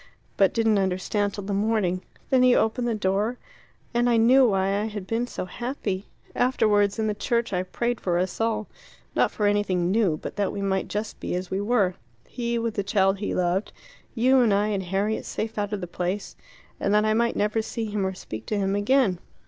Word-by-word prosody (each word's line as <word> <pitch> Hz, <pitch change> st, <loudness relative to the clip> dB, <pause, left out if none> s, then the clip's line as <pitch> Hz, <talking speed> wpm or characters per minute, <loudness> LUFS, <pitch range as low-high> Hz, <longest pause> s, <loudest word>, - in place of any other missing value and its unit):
But 195 Hz, -2 st, +4 dB
didn't 225 Hz, -2 st, +2 dB
understand 195 Hz, +2 st, 0 dB
till 205 Hz, -, -5 dB
the 200 Hz, +1 st, -3 dB
morning. 200 Hz, -3 st, +1 dB, 0.3 s
Then 260 Hz, -1 st, +5 dB
you 250 Hz, -1 st, +5 dB
opened 240 Hz, +2 st, +1 dB
the 230 Hz, -, 0 dB
door 210 Hz, +4 st, 0 dB, 0.6 s
and 240 Hz, +1 st, +2 dB
I 235 Hz, -, +4 dB
knew 250 Hz, +3 st, +6 dB
why 195 Hz, 0 st, +1 dB
I -, -, -1 dB
had 210 Hz, -3 st, -5 dB
been 230 Hz, +4 st, -1 dB
so 185 Hz, -, -5 dB
happy. 205 Hz, -2 st, -4 dB, 0.3 s
Afterwards, 210 Hz, -5 st, +2 dB
in 220 Hz, -, 0 dB
the 215 Hz, -, 0 dB
church, 235 Hz, +1 st, -1 dB
I 180 Hz, -, +1 dB
prayed 235 Hz, +6 st, -2 dB
for 175 Hz, -2 st, 0 dB
us 185 Hz, +4 st, -2 dB
all; 220 Hz, -1 st, 0 dB, 0.5 s
not -, -, +3 dB
for 210 Hz, -, -2 dB
anything 190 Hz, -4 st, +1 dB
new, 195 Hz, -7 st, +2 dB
but -, -, -8 dB
that 200 Hz, -2 st, 0 dB
we 200 Hz, -, -4 dB
might 190 Hz, -1 st, 0 dB
just 210 Hz, +1 st, -4 dB
be -, -, -3 dB
as 180 Hz, 0 st, -4 dB
we 190 Hz, +1 st, -1 dB
were 205 Hz, -4 st, +2 dB, 0.3 s
he 235 Hz, -1 st, -2 dB
with 230 Hz, -1 st, -1 dB
the 200 Hz, -, -1 dB
child 195 Hz, -1 st, +2 dB
he 205 Hz, -, -2 dB
loved, 180 Hz, +3 st, 0 dB, 0.4 s
you 260 Hz, +3 st, +4 dB
and 235 Hz, -4 st, +4 dB
I 205 Hz, +1 st, +1 dB
and 200 Hz, -2 st, -1 dB
Harriet 195 Hz, +4 st, -1 dB
safe 220 Hz, 0 st, -4 dB
out 205 Hz, 0 st, -2 dB
of 205 Hz, -2 st, -3 dB
the -, -, -3 dB
place 180 Hz, +3 st, -3 dB, 0.4 s
and 200 Hz, -, 0 dB
that 210 Hz, 0 st, +4 dB
I 215 Hz, -, +3 dB
might 235 Hz, +1 st, +1 dB
never 210 Hz, +2 st, +1 dB
see 225 Hz, +1 st, -4 dB
him 210 Hz, -2 st, -2 dB
or 190 Hz, 0 st, -2 dB
speak 110 Hz, -11 st, -8 dB
to 210 Hz, -, -1 dB
him 195 Hz, 0 st, 0 dB
again. 205 Hz, -3 st, +2 dB
205 Hz, 215 wpm, -25 LUFS, 190-225 Hz, 0.6 s, knew